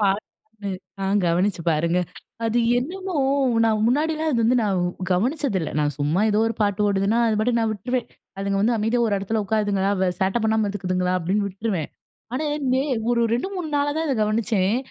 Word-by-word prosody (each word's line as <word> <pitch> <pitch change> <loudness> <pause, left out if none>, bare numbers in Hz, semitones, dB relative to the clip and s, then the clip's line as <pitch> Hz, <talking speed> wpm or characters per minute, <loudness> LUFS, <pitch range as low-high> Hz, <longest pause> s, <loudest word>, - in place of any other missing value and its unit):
பாட்டு 205 +1 -3 0.3
ஆ - - 0 0.2
கவனிச்சு 175 +1 +1
பாருங்க. 165 +3 +1 0.5
அது 225 +1 +1 0.2
என்னமோ, 370 +6 -4 0.5
நான் 215 -1 +2
முன்னாடிலாம் 310 +5 +1
அது 235 - +1
வந்து 250 +3 +3
நான் 195 -3 +1 0.3
கவனிச்சதில்ல. 225 - 0
நான் 145 -1 0
சும்மா 150 +6 +1
ஏதோ 210 - +2
ஒரு 225 - -1
பாட்டு 205 0 +1
ஓடுதுன்னா, 200 +3 +1
அது 220 -1 +1
பாட்டுக்கு 235 +1 +1
நான் 220 - +1
விட்டுருவேன். 245 +5 -3 0.3
அதுங்க 195 0 -1
வந்து 230 +3 +2
அமைதியா 225 +3 +1
ஒரு 205 - +1
இடத்துல 210 +2 -1
உட்காருதுங்களா! 200 -2 +1
வ 190 - +3
சேட்ட 190 +5 +1
பண்ணாம 220 0 +2
இருந்துக்குதுங்களா! 185 -2 -1
அப்பிடின்னு 195 +4 0
விட்டுருவேன். 190 -4 -3 0.5
ஆனா, 305 - -1 0.3
நே 265 - +2 0.3
ஒரு 235 - +2
2,3 360 +4 -3
நாளா 285 0 +1
தான் 320 - -1
இத 275 - +1
கவனிச்சேன். 215 -1 +1
215 Hz, 170 wpm, -23 LUFS, 195-240 Hz, 0.5 s, வந்து